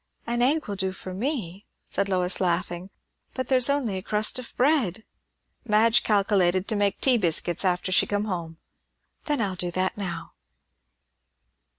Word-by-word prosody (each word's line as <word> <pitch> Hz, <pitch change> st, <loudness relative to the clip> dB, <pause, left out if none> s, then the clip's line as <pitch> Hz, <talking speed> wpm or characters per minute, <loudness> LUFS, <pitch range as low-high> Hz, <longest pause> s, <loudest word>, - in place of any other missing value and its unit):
"An 240 Hz, +1 st, -1 dB
egg 295 Hz, +5 st, +2 dB
will 205 Hz, -, -3 dB
do 190 Hz, -1 st, -2 dB
for 185 Hz, 0 st, -8 dB
me," 205 Hz, -, -4 dB, 0.2 s
said 200 Hz, -, -1 dB
Lois, 180 Hz, -1 st, +1 dB
laughing; 175 Hz, 0 st, -1 dB, 0.5 s
"but 260 Hz, -2 st, -4 dB
there's 255 Hz, -1 st, +4 dB
only 260 Hz, -9 st, 0 dB
a -, -, -4 dB
crust 215 Hz, +4 st, +1 dB
of 250 Hz, -, -8 dB
bread." 245 Hz, -, +2 dB, 0.6 s
"Madge 225 Hz, 0 st, +4 dB
calkilated 195 Hz, -3 st, +2 dB
to 220 Hz, -, 0 dB
make 205 Hz, -1 st, 0 dB
tea 255 Hz, -3 st, +4 dB
biscuits 175 Hz, -1 st, 0 dB
after 185 Hz, 0 st, 0 dB
she 185 Hz, -, +4 dB
come 205 Hz, 0 st, -1 dB
home." 170 Hz, -5 st, -5 dB, 0.7 s
"Then 295 Hz, -3 st, +1 dB
I'll 200 Hz, -4 st, 0 dB
do 180 Hz, -1 st, -3 dB
that 185 Hz, +2 st, -1 dB
now." 175 Hz, -4 st, -5 dB
200 Hz, 160 wpm, -25 LUFS, 180-235 Hz, 0.7 s, there's